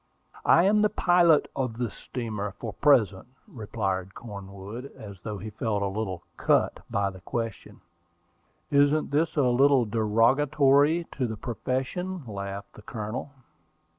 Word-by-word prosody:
"I 170 - +6
am 210 +2 +4
the 210 - +4
pilot 175 -5 +4
of 125 -4 -2
this 120 -4 -2
steamer 105 -5 -5
for 115 - -5
the - - -23
present," 110 -10 +3 0.2
replied 100 - -3
Cornwood; 100 +2 -8
and 105 -2 -9
I - - -17
thought 105 0 -6
he 110 - -6
felt 105 -1 -1
a - - +1
little 95 -3 -4
"cut" - - +2
by 100 -1 0
the 95 -1 -13
question. 115 -1 -5 0.9
"Isn't 145 +2 +3
this 155 +4 +1
a 145 - +3
little 130 +1 +4
derogatory 135 +8 +3
to 130 -3 -2
the 110 -1 -5
profession?" 130 - -3
laughed 100 -2 -6
the - - -13
Colonel. 110 +5 -5
115 Hz, 145 wpm, -27 LUFS, 100-145 Hz, 0.9 s, I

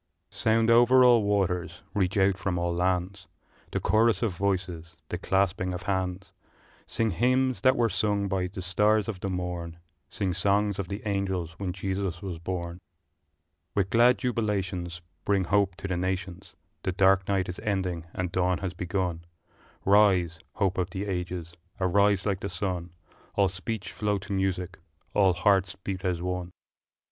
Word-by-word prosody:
Sound 115 +1 +2
over 120 +2 +6
all 120 -2 +6
waters, 90 -4 0
reach 95 -1 0
out 95 0 +4
from 90 -1 -2
all 85 0 0
lands, 90 +1 -1 0.4
The - - -1
chorus 110 -1 +3
of 105 -6 0
voices, 90 -3 -2
the 90 - -3
clasping 95 -1 0
of 90 - -6
hands; 95 0 -2 0.5
Sing 115 -1 0
hymns 130 +6 +1
that 130 0 +5
were 120 -1 +3
sung 100 0 0
by 95 -2 -1
the 95 0 -7
stars 105 +3 +2
of 105 -5 -4
the 95 - -3
morn, 90 -2 -4 0.3
Sing 95 -3 -2
songs 100 +3 +1
of 95 - -2
the 100 +2 -5
angels 95 -4 -1
when 95 -2 -2
Jesus 95 -1 -3
was 90 -4 -6
born! 85 0 -4 1.0
With 95 -2 +1
glad 120 +2 +5
jubilations 95 -8 -2 0.2
Bring 100 -2 +2
hope 100 0 +2
to 100 - -6
the 90 -2 -1
nations 95 0 -4 0.3
The 95 - -2
dark 95 0 +4
night 95 -2 +1
is 90 - -6
ending 95 -6 -2
and 90 -1 -3
dawn 90 -1 +1
has 95 -2 -4
begun 90 -1 -2 0.6
Rise, 95 -5 +4 0.2
hope 95 -3 0
of 90 0 0
the 95 +3 -4
ages, 90 -3 -4 0.3
arise 100 +1 +3
like 100 -3 0
the 100 - -4
sun, 90 -1 -3 0.5
All 100 -2 +3
speech 95 +1 -5
flow 105 -1 0
to 95 +1 -6
music, 95 -1 -1 0.3
all 95 -3 +4
hearts 95 0 +2
beat 95 0 -5
as 90 -2 -1
one! 90 -1 -2
II. - - -17
95 Hz, 165 wpm, -27 LUFS, 90-100 Hz, 1.0 s, over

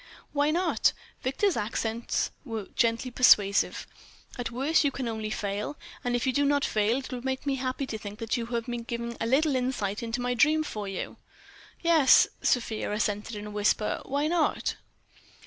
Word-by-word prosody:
"Why 290 0 +2
not?" 350 +4 +2 0.3
Victor's 345 +9 +1
accents 225 +2 -1
were 225 -7 -5
gently 230 +2 +1
persuasive. 205 -5 +4 0.5
"At 245 -2 -3
worst, 275 +8 +2
you 285 - +3
can 260 -2 -4
only 220 -1 -3
fail. 210 +6 -3 0.3
And 245 0 0
if 245 - 0
you 260 - +1
do 285 - +2
not 285 0 +2
fail, 215 +3 +1
it 270 - -6
will 250 -1 -4
make 265 +2 -3
me 275 -1 0
happy 260 +1 -2
to 220 -4 -5
think 205 0 -8
that 225 +1 -2
you 235 -2 -3
have 235 -1 -2
been 240 -1 -4
given 235 0 -4
a 225 - 0
little 280 +3 +3
insight 250 -6 -1
into 230 +1 -3
my 245 0 0
dreams 310 +5 +3
for 210 -7 -5
you." 195 -2 -5 0.7
"Yes," 325 -5 +6
Sofia 230 -4 0
assented 210 +1 -1
in 210 0 -6
a 210 - -7
whisper—"why 215 +7 0
not?" 325 0 +1
240 Hz, 180 wpm, -28 LUFS, 220-275 Hz, 0.7 s, Yes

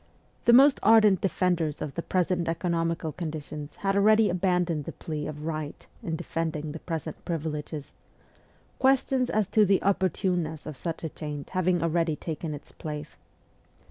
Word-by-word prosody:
The - - +7
most 275 +3 +7
ardent 215 -3 +6
defenders 175 -5 0
of 140 - -4
the 170 - -3
present 180 -1 0
economical 165 -1 -1
conditions 155 -3 -6
had 195 0 -1
already 215 +1 +5
abandoned 180 -4 0
the - - -4
plea 150 -2 -5
of 150 0 -6
right 155 -2 -4 0.2
in 165 - -3
defending 160 -2 -3
the 160 - -7
present 160 -2 -5
privileges 155 -3 -4 0.9
ques 265 0 +4
tions 255 -2 +1
as 215 -3 +1
to 215 - +5
the 195 -1 +4
opportuneness 180 -4 0
of 155 - -6
such 165 +4 -5
a, 160 - -2
change 150 -2 -6
having 185 -2 +1
already 165 -1 +1
taken 155 0 -4
its 145 - -12
place. 150 -1 -7
165 Hz, 155 wpm, -27 LUFS, 155-185 Hz, 0.9 s, The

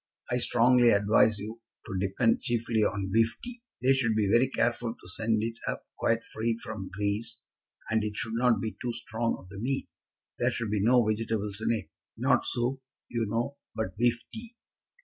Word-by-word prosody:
I 125 - +2
strongly 120 0 +5
advise 105 +1 +4
you 110 +3 -7 0.2
to 95 - -5
depend 100 +5 +2
chiefly 115 -1 0
on 100 -2 0
beef 115 +1 +3
tea. 245 -1 -7 0.2
They 135 +1 +6
should 120 -5 +1
be 105 -2 +2
very 120 +3 +4
careful 120 -2 0
to - - -14
send 110 +3 0
it 115 0 -3
up - - -3
quite 115 0 +1
free 115 +1 -2
from 100 -4 -5
grease, 105 +4 -2 0.5
and 110 -1 +1
it 105 -1 -3
should 110 - -3
not 120 0 +3
be 110 - -2
too 120 -1 -2
strong 115 0 -2
of 90 - -15
the 100 0 -8
meat. 135 +5 -1 0.5
There 120 - +3
should 115 -3 -2
be 105 -2 +1
no 120 +2 +5
vegetables 110 -1 -1
in - - +1
it. 105 -9 -2 0.3
Not - - +2
soup, 125 +3 0 0.3
you 115 -2 -1
know, 120 +6 -1 0.2
but 95 -5 -3
beef 120 0 +2
tea. 230 +1 -8
115 Hz, 190 wpm, -29 LUFS, 105-120 Hz, 0.5 s, They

